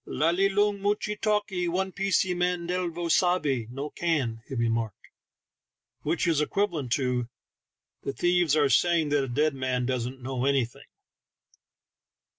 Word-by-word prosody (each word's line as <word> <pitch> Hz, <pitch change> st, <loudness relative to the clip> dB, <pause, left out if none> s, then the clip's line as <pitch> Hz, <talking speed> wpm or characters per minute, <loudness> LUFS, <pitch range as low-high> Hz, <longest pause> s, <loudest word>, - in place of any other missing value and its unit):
"La 160 Hz, +2 st, +1 dB
li 195 Hz, +3 st, +2 dB
loong 205 Hz, 0 st, +1 dB
muchee 210 Hz, +1 st, 0 dB
talkee 210 Hz, -4 st, 0 dB
one 190 Hz, +2 st, -1 dB
piecee 195 Hz, -1 st, +1 dB
man 180 Hz, -1 st, 0 dB
dielo 175 Hz, -1 st, -2 dB
savvey 155 Hz, -, +2 dB
no 140 Hz, +4 st, -5 dB
can," 135 Hz, -10 st, -1 dB
he 135 Hz, -, -6 dB
remarked, 115 Hz, -3 st, -2 dB, 0.9 s
which 160 Hz, +4 st, 0 dB
is 165 Hz, -3 st, +2 dB
equivalent 160 Hz, -, -1 dB
to 125 Hz, -2 st, 0 dB, 0.7 s
"The -, -, -3 dB
thieves 175 Hz, 0 st, +2 dB
are 150 Hz, -2 st, +4 dB
saying 165 Hz, +1 st, +3 dB
that 145 Hz, -1 st, +2 dB
a -, -, -3 dB
dead 150 Hz, +5 st, +1 dB
man 130 Hz, -2 st, -1 dB
doesn't 130 Hz, 0 st, -2 dB
know 130 Hz, 0 st, -2 dB
anything." 135 Hz, -4 st, 0 dB
155 Hz, 140 wpm, -27 LUFS, 130-180 Hz, 0.9 s, are